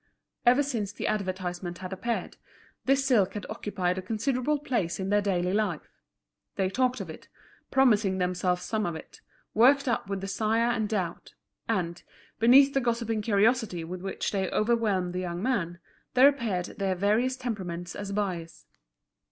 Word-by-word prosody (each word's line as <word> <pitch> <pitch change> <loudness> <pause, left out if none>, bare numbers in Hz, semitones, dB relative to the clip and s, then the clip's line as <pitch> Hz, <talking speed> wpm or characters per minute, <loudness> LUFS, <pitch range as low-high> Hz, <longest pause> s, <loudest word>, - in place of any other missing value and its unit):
Ever 250 +4 +6
since 230 -8 -2
the - - -5
advertisement 185 -3 -2
had 185 0 -6
appeared, 235 +5 -3 0.5
this 270 0 +3
silk 220 -9 +3
had 205 - -4
occupied 185 -3 -2
a - - -4
considerable 250 +8 0
place 235 - -2
in 190 0 -2
their 205 0 +3
daily 185 -2 0
life. 215 +1 -1 0.6
They 190 -1 0
talked 255 +3 +1
of - - -7
it, - - -12 0.4
promising 215 -8 +3
themselves 180 0 0
some 215 -3 -1
of 170 - -3
it, 160 - -11 0.3
worked 270 +5 +5
up 235 -4 -1
with 195 -1 -2
desire 220 +4 +1
and 220 -3 -1
doubt. 185 -6 -3 0.3
And, 175 -6 -1 0.4
beneath 270 +4 +7
the 270 - +2
gossiping 230 -2 -1
curiosity 210 -3 +2
with 180 +2 -6
which 195 0 -3
they 195 -2 -1
overwhelmed 210 -5 +1
the 180 - -2
young 175 0 -4
man, 180 -10 -1 0.4
there 260 +2 +8
appeared 230 -11 0
their 190 -1 0
various 220 +7 +1
temperaments 185 -8 -4
as 200 -1 -5
buyers. 185 -5 -3
205 Hz, 160 wpm, -28 LUFS, 185-235 Hz, 0.6 s, there